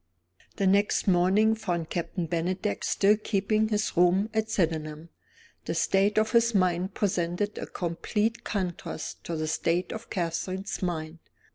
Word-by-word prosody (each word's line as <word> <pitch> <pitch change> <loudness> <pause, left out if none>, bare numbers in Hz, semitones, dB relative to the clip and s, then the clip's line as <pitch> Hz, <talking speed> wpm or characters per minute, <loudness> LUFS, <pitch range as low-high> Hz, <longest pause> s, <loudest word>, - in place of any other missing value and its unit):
The 200 - 0
next 200 +2 +2
morning 190 +4 +4
found 175 -7 -3
Captain 175 0 -2
Bennydeck 180 +5 -2
still 205 +2 +3
keeping 215 +1 +1
his 215 -1 -1
rooms 180 +4 +3
at 220 0 0
Sydenham. 160 -3 -1 0.6
The - - -2
state 200 +2 +2
of 220 0 +3
his 235 -1 +3
mind 185 0 +1
presented 185 +1 -1
a - - -5
complete 210 +6 -2
contrast 185 -4 -4
to 170 - -3
the 155 0 -2
state 165 +3 0
of 225 0 -8
Catherine's 185 +2 -3
mind. 165 -3 -3
185 Hz, 140 wpm, -27 LUFS, 170-210 Hz, 0.6 s, morning